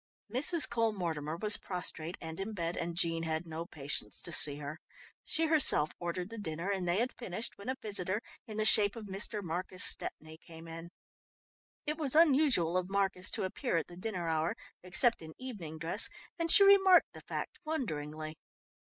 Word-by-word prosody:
Mrs. 300 +6 +5
Cole 230 -2 +1
Mortimer 160 -5 -3
was 210 +3 +3
prostrate 175 -2 -5
and 160 +1 -7
in 205 +3 -4
bed, 170 -3 -2
and 170 0 -4
Jean 165 -1 0
had 160 +1 -2
no 165 +1 -6
patience 140 -9 -2
to 170 - -2
see 145 -1 +7
her. 150 +2 -7 0.5
She 325 - +2
herself 295 - +4
ordered 175 +3 -4
the 230 - -7
dinner, 170 0 -3
and 190 -3 -2
they 175 +2 +2
had 240 +4 0
finished 220 -1 -5
when 200 +5 -6
a 260 - 0
visitor 200 -2 -2 0.3
in 215 -1 -7
the 215 - +1
shape 205 -1 +5
of 225 -2 -7
Mr. 205 +2 -1
Marcus 180 +2 -4
Stepney 155 0 -2
came 165 -1 -12
in. 165 +1 -8 1.0
It 300 0 -2
was 290 -3 -1
unusual 275 - +4
of 185 0 -2
Marcus 195 -2 0
to - - -3
appear 190 +2 -1
at 165 - -1
the 175 - -13
dinner 185 -2 -4
hour, 160 0 0 0.3
except 210 +6 +2
in 160 -1 -10
evening 200 -12 -7
dress, 165 +7 -2 0.3
and 330 -1 +1
she 400 - +9
remarked 385 -3 +6
the - - -10
fact 455 - -5
wonderingly. 155 - -4
185 Hz, 185 wpm, -32 LUFS, 165-225 Hz, 1.0 s, she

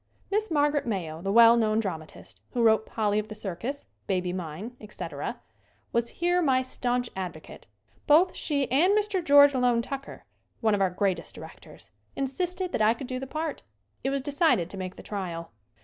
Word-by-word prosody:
Miss 425 +2 +1
Margaret 290 -3 +1
Mayo, 170 -7 -3
the 195 +2 -1
well 230 +2 +8
known 220 -2 +2
dra 200 -4 0
matist, 95 -12 -12
who 240 - +1
wrote 220 -1 +4
"Polly 210 -2 0
of 215 - -4
the 215 - -8
Circus," 220 +8 -5 0.2
"Baby 180 -2 0
Mine," 185 +7 -6
etc., 210 -1 -6 0.5
was 235 0 +1
here 350 +1 +1
my 260 -5 +3
stanch 245 -1 -2
advo 180 -5 -5
cate. - - -13 0.4
Both 340 +5 +5
she 285 -3 0
and 360 +10 +4
Mr. 410 -4 0
George 285 -2 +7
Loane 245 -2 +2
Tucker, 275 +2 -7 0.3
one 220 -2 +2
of 200 - +1
our 190 - +3
greatest 180 -2 -2
directors, - - -13 0.2
insisted 355 +7 -2
that - - -1
I 215 +2 +4
could 265 - -7
do 255 0 -4
the 265 - -6
part. 310 +2 -4 0.4
It 270 - +1
was 275 -1 -1
decided 280 - +2
to 195 - -7
make 185 -1 -5
the - - -11
trial. 175 -5 -5
235 Hz, 185 wpm, -27 LUFS, 195-285 Hz, 0.5 s, well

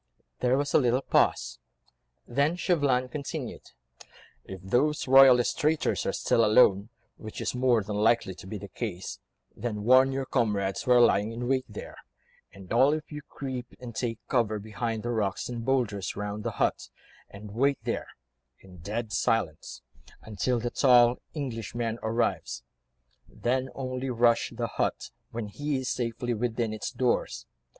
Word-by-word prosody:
There 125 +1 +2
was 145 0 -1
a - - +6
little 125 0 +1
pause, - - +1 0.7
then 140 +7 +1
Chauvelin 145 -8 +1
continued,— 140 +1 -6 0.7
"If 95 - -9
the 125 +10 +2 0.2
royalist 130 -1 +6
traitors 155 0 +1
are - - +2
still 115 - +2
alone, 105 -2 +4 0.3
which 110 -1 -8
is - - -2
more 125 -3 +2
than 105 +1 -4
likely 110 -2 +2
to 95 - -12
be 105 - -5
the 100 +1 -8
case, 100 -5 -5 0.4
then 105 -2 -4
warn 130 +3 +6
your 135 0 -2
comrades 105 -7 0
who 125 - -1
are 125 - +6
lying 110 -2 +4
in 120 +1 -4
wait 130 0 0
there, 105 - -9 0.5
and 95 -1 -9
all 135 +5 +5
of 155 0 -8
you 150 0 -6
creep 130 -3 -6
and 125 -2 -8
take 115 -3 -2
cover 115 -4 +1
behind 110 +2 -4
the 120 - -2
rocks 105 -4 -1
and 120 -2 -5
boulders 115 -8 0
round 105 +1 -4
the - - -3
hut, - - 0 0.4
and 100 +1 -10
wait 135 +6 +2
there, - - -3 0.5
in 95 -1 -15
dead 105 +6 -4
silence, 90 -10 -1 0.4
until 110 +4 -1
the 120 +1 -3
tall 125 -2 +5
Englishman 115 -4 -3
arrives; 115 +2 -1 0.7
then 130 +2 -1
only 130 0 -4
rush 120 -1 +3
the 120 0 -2
hut, 115 - -2 0.2
when 115 -2 -5
he 145 +7 -3
is 130 -1 -3
safely 120 0 -2
within 115 -1 -1
its 110 - -4
doors. 65 - -1
120 Hz, 160 wpm, -28 LUFS, 105-130 Hz, 0.7 s, a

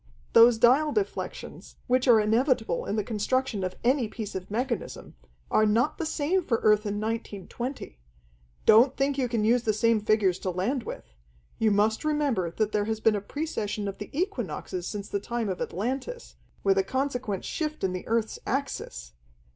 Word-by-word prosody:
Those 230 0 +7
dial 260 +7 +4
deflections, 415 -2 -4
which 255 +1 +1
are 235 -3 +7
inevitable 225 - +1
in 205 - -1
the 210 - 0
construction 220 0 -1
of 185 0 -3
any 250 -1 +2
piece 215 -1 -6
of 190 0 -6
mechanism, 235 +3 -3 0.4
are 215 - +4
not 230 +7 +1
the 330 - -1
same 335 +5 0
for 235 -7 +1
Earth 210 0 +4
in 205 - -2
1920. 225 - -5 0.7
Don't 240 +5 +6
think 275 0 0
you 250 -2 0
can 225 -3 0
use 240 +2 +4
the 220 -2 +1
same 230 +1 +2
figures 205 -3 +2
to 185 - -3
land 195 +10 -1
with. - - -8 0.5
You 220 - +3
must 210 +2 +2
remember 290 - 0
that 215 +5 -1
there 210 -1 0
has 220 0 -2
been 220 -1 +3
a 205 - -2
precession 210 -5 -3
of 195 0 -6
the 205 - -7
equinoxes 235 - -3
since 205 -1 -5
the 200 - -2
time 235 0 -3
of 185 - -4
Atlantis, 265 - -4 0.3
with 195 -1 +3
a - - +3
consequent 250 -3 -2
shift 310 -2 -3
in 185 -1 0
the 185 - -6
earth's 225 -1 -1
axis. 60 - -4
225 Hz, 180 wpm, -27 LUFS, 205-260 Hz, 0.7 s, Those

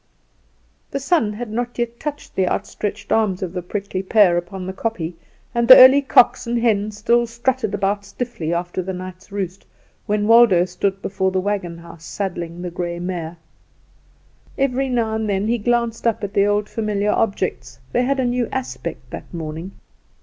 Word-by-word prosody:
The 275 - -3
sun 275 -7 +1
had 225 +1 -6
not 240 +2 -3
yet 235 -1 -3
touched 295 0 -6
the 190 -1 +1
outstretched 205 +3 -3
arms 200 -4 +1
of 180 -1 -4
the 180 - -3
prickly 190 +1 -4
pear 195 -2 +4
upon 180 +2 -4
the 190 - -5
kopje, 190 -5 -3 0.4
and 235 0 +1
the 255 - +12
early 260 +2 +9
cocks 245 -2 +4
and 235 0 0
hens 215 -3 +1
still 235 +3 +2
strutted 235 -2 -1
about 200 +1 -1
stiffly 200 -5 -5
after 175 +1 -2
the 190 +1 -4
night's 185 +2 -9
roost, 195 -2 -4 0.4
when 210 0 +1
Waldo 225 -6 +6
stood 190 +2 -2
before 190 -1 0
the 190 0 0
wagon 185 -3 -2
house 170 -1 -13
saddling 175 -3 -4
the 180 - -4
grey 175 0 -4
mare. 175 -2 -5 1.2
Every 270 0 0
now 230 -3 0
and 220 -1 -2
then 200 +1 0
he 235 +1 +1
glanced 235 +1 0
up 225 -1 0
at 200 0 -4
the 200 0 +3
old 205 0 +1
familiar 210 -2 -1
objects: 205 -3 -1
they 245 - +2
had 270 +2 0
a 260 - +1
new 245 -1 0
aspect 130 -1 -5
that - - -8
morning. 165 +2 -6
205 Hz, 180 wpm, -21 LUFS, 180-235 Hz, 1.2 s, the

